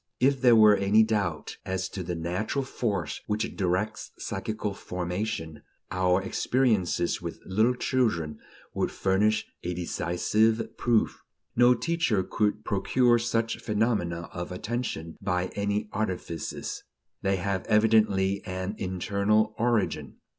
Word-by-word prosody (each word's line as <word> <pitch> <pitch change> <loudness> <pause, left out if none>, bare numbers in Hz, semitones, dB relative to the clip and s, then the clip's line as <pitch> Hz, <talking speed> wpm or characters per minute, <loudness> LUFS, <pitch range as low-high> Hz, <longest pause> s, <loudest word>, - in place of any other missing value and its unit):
If 135 +1 +3
there 125 -3 +7
were 105 -2 +7
any 100 +3 +4
doubt 110 -2 -1
as 95 0 -2
to 95 - -5
the 90 0 -3
natural 90 - -2
force 100 - -2
which 105 +1 -2
directs 95 +3 -1
psychical 110 -2 -3
formation, 90 -4 -4 0.3
our 90 +1 +2
experiences 105 -7 +1
with 85 -1 -6
little 110 +6 +2
children 95 - 0 0.3
would - - 0
furnish 105 +3 +1 0.2
a 90 0 -3
decisive 105 +6 0
proof. 120 -2 +1 0.3
No 125 +1 +6
teacher 165 - +1
could 105 +3 -1
procure 120 +4 +3
such 115 -1 -1
phenomena 105 -6 0
of 90 0 -5
attention 100 -5 -4
by 90 -2 0
any 100 +1 -1
artifices; 90 -6 -4 0.4
they 95 0 +1
have 95 0 -2
evidently 105 -3 +3
an 95 +2 -4
internal 100 +4 +1
origin. 115 -3 0
105 Hz, 120 wpm, -27 LUFS, 90-110 Hz, 0.4 s, there